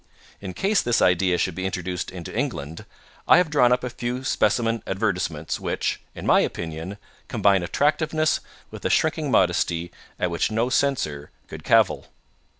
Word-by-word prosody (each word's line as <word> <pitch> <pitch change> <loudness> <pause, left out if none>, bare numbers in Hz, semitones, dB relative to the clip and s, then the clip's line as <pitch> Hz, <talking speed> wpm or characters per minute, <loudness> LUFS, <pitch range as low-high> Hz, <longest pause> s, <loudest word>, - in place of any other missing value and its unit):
In 95 -2 -7
case 200 +1 +2
this 120 -1 +1
idea 90 0 +3
should 95 - 0
be 95 +2 -3
introduced 90 -1 -4
into 90 -3 -8
England, 85 - -3 0.4
I - - +7
have 180 -4 +2
drawn 125 -5 +4
up 125 - +2
a 125 - -2
few 125 +1 -4
specimen 115 -3 +1
advertisements 95 -6 -2
which, - - -2
in - - -7
my - - +5
opinion, 85 +4 -4 0.3
combine 100 -2 +3
attractiveness 155 - +1 0.3
with - - -10
a - - 0
shrinking 155 -2 +1
modesty 85 -5 +1 0.3
at 90 - 0
which 85 - 0
no 115 +3 0
censor 125 - 0 0.2
could - - -9
cavil." - - +3
100 Hz, 155 wpm, -24 LUFS, 85-130 Hz, 0.4 s, I